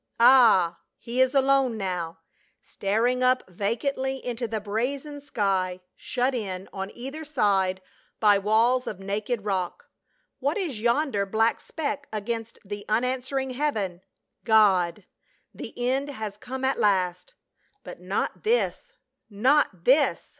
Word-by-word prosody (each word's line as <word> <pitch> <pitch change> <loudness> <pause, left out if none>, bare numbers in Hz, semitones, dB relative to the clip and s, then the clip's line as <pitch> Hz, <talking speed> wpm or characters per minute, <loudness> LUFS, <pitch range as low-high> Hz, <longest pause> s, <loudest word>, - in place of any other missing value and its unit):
Ah, 225 -9 +6 0.2
he 240 +2 -1
is 260 +2 +3
alone 270 -3 +3
now, 175 -5 -4 0.4
staring 230 +6 0
up 255 0 +2
vacantly 235 +8 -2
into 240 -1 -3
the 220 0 -2
brazen 265 +8 -3
sky, 190 -8 -1 0.2
shut 255 +2 -1
in 195 -6 -4
on 195 0 -4
either 270 +6 -6
side 195 -10 +1 0.4
by 205 -2 +5
walls 230 +5 +2
of 200 - -5
naked 205 +3 -3
rock. 185 -4 -3 0.5
What 285 +6 0
is 305 - -3
yonder 235 -4 +1
black 225 +3 +2
speck 285 -2 -4
against 225 +1 -4
the 205 +1 -6
unan 250 +4 +1
swering 265 0 -3
heaven? 215 -11 -2 0.4
God! 200 -4 +3 0.5
the - - -7
end 260 +4 0
has 220 -7 -5
come 260 +5 -5
at 265 - 0
last: 180 -3 0 0.5
but - - -9
not - - -3
this 485 +2 0 0.2
— - - -56 0.2
not 265 - +3
this 280 +3 +3
230 Hz, 130 wpm, -26 LUFS, 200-265 Hz, 0.5 s, Ah